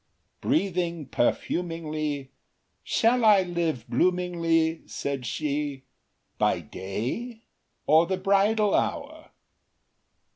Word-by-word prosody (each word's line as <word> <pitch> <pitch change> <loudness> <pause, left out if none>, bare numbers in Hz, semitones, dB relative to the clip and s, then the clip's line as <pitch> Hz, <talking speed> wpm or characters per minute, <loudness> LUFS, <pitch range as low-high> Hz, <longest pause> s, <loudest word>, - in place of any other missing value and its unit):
Breathing 175 - 0
perfumingly; 155 0 -2 0.5
Shall 235 +2 +2
I 210 -3 +6
live 170 -9 -2
bloomingly, 165 +2 +1
Said 135 -3 -4
she, 145 0 -2 0.6
by - - +2
day, 125 - -5 0.4
or 160 +3 +5
the 190 0 -1
bridal 200 +2 +2
hour? - - -2
165 Hz, 80 wpm, -26 LUFS, 145-190 Hz, 0.6 s, I